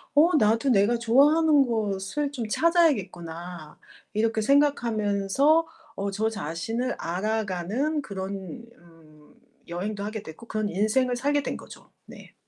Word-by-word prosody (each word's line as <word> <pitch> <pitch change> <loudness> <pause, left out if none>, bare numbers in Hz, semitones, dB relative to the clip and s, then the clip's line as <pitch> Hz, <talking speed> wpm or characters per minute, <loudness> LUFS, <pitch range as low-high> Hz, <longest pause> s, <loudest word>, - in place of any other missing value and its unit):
'어 325 +5 +6
나도 225 +2 +2
내가 230 +1 +3
좋아하는 285 +5 +4
것을 220 +5 -2
좀 235 -6 -4
찾아야겠구나.' 180 - 0 0.3
이렇게 220 +1 +1
생각하면서 255 +2 +2 0.3
어 200 0 -2
저 215 +3 -1
자신을 225 +6 -3
알아가는 215 - -2
그런 195 - -6 0.2
음 160 -3 -21 0.3
여행도 200 +4 -4
하게 215 0 -5
됐고 160 +9 -11
그런 215 -2 -2
인생을 220 +7 +1
살게 285 +2 0
된 - - -3
거죠. - - -14
네. - - -14
215 Hz, 270 characters per minute, -26 LUFS, 190-270 Hz, 0.3 s, 어